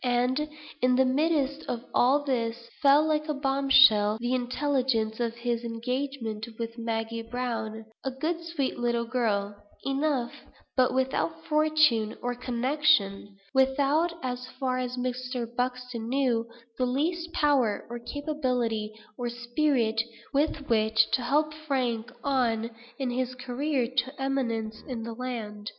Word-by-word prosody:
And, 250 Hz, +4 st, +1 dB, 0.3 s
in 250 Hz, 0 st, +4 dB
the 265 Hz, +1 st, +4 dB
midst 285 Hz, +1 st, +1 dB
of 235 Hz, -1 st, -2 dB
all 275 Hz, +4 st, +4 dB
this, 235 Hz, -3 st, -2 dB
fell, 290 Hz, +1 st, +6 dB
like 305 Hz, 0 st, 0 dB
a 300 Hz, -, 0 dB
bombshell, 270 Hz, -6 st, +5 dB
the 240 Hz, +2 st, -1 dB
intelligence 255 Hz, -3 st, 0 dB
of 235 Hz, -1 st, -1 dB
his 235 Hz, 0 st, -2 dB
engagement 235 Hz, -1 st, -3 dB
with 230 Hz, 0 st, -4 dB
Maggie 230 Hz, 0 st, -2 dB
Browne; 225 Hz, -2 st, -4 dB, 0.2 s
a 270 Hz, -, 0 dB
good 320 Hz, +6 st, -2 dB
sweet 330 Hz, -7 st, -2 dB
little 235 Hz, -1 st, +1 dB
girl 210 Hz, -5 st, 0 dB, 0.3 s
enough, 275 Hz, -3 st, 0 dB, 0.4 s
but 255 Hz, -1 st, +4 dB
without 270 Hz, +5 st, 0 dB
fortune 305 Hz, -8 st, +3 dB
or 245 Hz, 0 st, -2 dB
connection 245 Hz, -5 st, +1 dB, 0.2 s
without, 275 Hz, +5 st, +3 dB
as 250 Hz, 0 st, -3 dB
far 255 Hz, -1 st, 0 dB
as 250 Hz, 0 st, -3 dB
Mr. 250 Hz, -1 st, -2 dB
Buxton 250 Hz, -2 st, -2 dB
knew, 250 Hz, -4 st, +1 dB, 0.3 s
the 255 Hz, -, +2 dB
least 330 Hz, +6 st, -1 dB
power, 270 Hz, -8 st, +2 dB
or 240 Hz, +1 st, -6 dB
capability, 250 Hz, -6 st, -1 dB, 0.3 s
or 240 Hz, -1 st, -1 dB
spirit, 240 Hz, -1 st, +1 dB, 0.3 s
with 285 Hz, 0 st, 0 dB
which 220 Hz, -1 st, +3 dB
to 255 Hz, -, +2 dB
help 300 Hz, +5 st, +1 dB
Frank 255 Hz, -6 st, -2 dB
on 235 Hz, -4 st, +1 dB, 0.3 s
in 260 Hz, -2 st, -1 dB
his 255 Hz, 0 st, -2 dB
career 260 Hz, +1 st, -1 dB
to 265 Hz, +2 st, 0 dB
eminence 230 Hz, -5 st, -1 dB
in 240 Hz, -4 st, -4 dB
the 230 Hz, 0 st, -5 dB
land! 225 Hz, -4 st, -5 dB
250 Hz, 135 wpm, -28 LUFS, 230-275 Hz, 0.4 s, fell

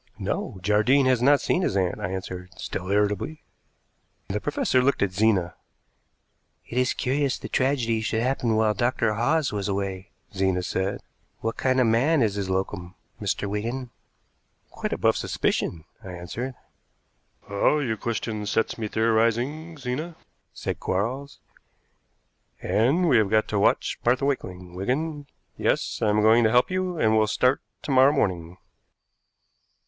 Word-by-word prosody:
"No, -, -, -3 dB
Jardine 110 Hz, +8 st, +3 dB
has 130 Hz, -2 st, +3 dB
not 140 Hz, +2 st, +5 dB
seen 180 Hz, -, +1 dB
his 100 Hz, -, 0 dB
aunt," 90 Hz, -2 st, 0 dB
I -, -, -3 dB
answered, 95 Hz, -1 st, -6 dB
still 90 Hz, -, -5 dB
irritably. 105 Hz, +9 st, 0 dB, 0.9 s
The 105 Hz, +2 st, -2 dB
professor 140 Hz, -3 st, +1 dB
looked 140 Hz, -2 st, +2 dB
at 100 Hz, -, 0 dB
Zena. 95 Hz, -3 st, +2 dB, 1.1 s
"It 125 Hz, -, -2 dB
is 125 Hz, 0 st, +1 dB
curious 135 Hz, +1 st, 0 dB
the -, -, -7 dB
tragedy 125 Hz, -4 st, +1 dB
should 110 Hz, +1 st, -1 dB
happen 125 Hz, -3 st, 0 dB
while 110 Hz, -1 st, +3 dB
Dr. 120 Hz, 0 st, +1 dB
Hawes 140 Hz, +7 st, +1 dB
was 100 Hz, -1 st, -2 dB
away," 95 Hz, -1 st, -3 dB, 0.2 s
Zena 95 Hz, -2 st, 0 dB
said. 95 Hz, +2 st, -2 dB, 0.4 s
"What 115 Hz, +1 st, -2 dB
kind 130 Hz, 0 st, +1 dB
of 130 Hz, -, +4 dB
man 130 Hz, +6 st, +3 dB
is 105 Hz, -3 st, +1 dB
his 100 Hz, -2 st, -3 dB
locum, 95 Hz, -1 st, -3 dB, 0.3 s
Mr. 100 Hz, 0 st, -1 dB
Wigan?" 120 Hz, +5 st, -3 dB, 0.8 s
"Quite -, -, -4 dB
above -, -, +2 dB
suspicion," 80 Hz, -2 st, -1 dB, 0.2 s
I 95 Hz, -2 st, -8 dB
answered. 115 Hz, +9 st, -5 dB, 0.9 s
"Ah, 100 Hz, +9 st, +2 dB
your 125 Hz, -7 st, -1 dB
question 110 Hz, -2 st, -3 dB
sets 110 Hz, +3 st, 0 dB
me 110 Hz, -, -2 dB
theorizing, 115 Hz, +9 st, 0 dB
Zena," 145 Hz, +6 st, -4 dB, 0.4 s
said -, -, -4 dB
Quarles, 125 Hz, +9 st, -3 dB, 1.2 s
"and 140 Hz, +11 st, +2 dB
we 130 Hz, -6 st, +5 dB
have 105 Hz, -3 st, +3 dB
got 110 Hz, +1 st, +2 dB
to 105 Hz, -, 0 dB
watch -, -, +1 dB
Martha 125 Hz, +3 st, +2 dB
Wakeling, 90 Hz, -10 st, -3 dB
Wigan. 145 Hz, -, -2 dB, 0.3 s
Yes, -, -, 0 dB
I 110 Hz, -, +2 dB
am 105 Hz, 0 st, +2 dB
going 115 Hz, +2 st, +6 dB
to 110 Hz, -, +4 dB
help 125 Hz, +8 st, +3 dB
you, 185 Hz, -1 st, -1 dB
and 110 Hz, -5 st, +3 dB
we'll 110 Hz, -1 st, +3 dB
start 125 Hz, +6 st, +2 dB, 0.2 s
to -, -, -3 dB
morrow 130 Hz, +1 st, +6 dB
morning." 90 Hz, -, -1 dB
110 Hz, 150 wpm, -25 LUFS, 100-130 Hz, 1.2 s, going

